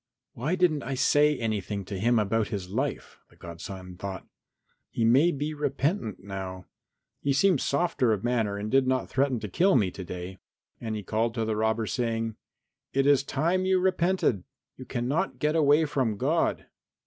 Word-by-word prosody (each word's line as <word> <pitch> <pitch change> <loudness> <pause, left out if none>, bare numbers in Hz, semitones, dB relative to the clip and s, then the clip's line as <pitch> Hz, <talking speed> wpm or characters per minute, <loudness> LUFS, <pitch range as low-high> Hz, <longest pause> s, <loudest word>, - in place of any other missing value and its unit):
"Why 150 +10 -1
didn't 175 -5 +2
I 135 +1 -3
say 145 +2 +3
anything 105 -3 -3
to 95 0 -5
him 120 +4 +3
about 110 0 +1
his 95 -3 -5
life?" 130 +8 -3
the - - -22
godson 90 +2 -9
thought. 95 0 -6 0.6
"He 115 - -1
may 135 +9 +5
be 150 +1 -3
repentant 145 - -2
now. 95 -2 -6 0.6
He 140 - +1
seemed 175 +1 +3
softer 140 -5 +1
of 105 -3 -1
manner 115 -4 0
and 105 +1 -4
did 135 0 +3
not 130 0 0
threaten 135 -2 +1
to 105 - -4
kill 175 - +3
me 100 -7 +2
to 95 - -7
day." 90 +1 -7 0.4
And 110 -2 -4
he 105 - -5
called 115 +3 -1
to 115 -2 -1
the 110 -1 -1
robber 110 +1 0
saying, 115 -1 -2 0.6
"It 135 0 +2
is 140 -1 +5
time 165 +7 0
you 190 -1 +3
repented. 180 - +1 0.3
You 130 - -10
cannot 130 +9 -1
get 150 +1 0
away 150 0 +4
from 130 -8 -1
God." - - 0
120 Hz, 175 wpm, -27 LUFS, 105-145 Hz, 0.6 s, may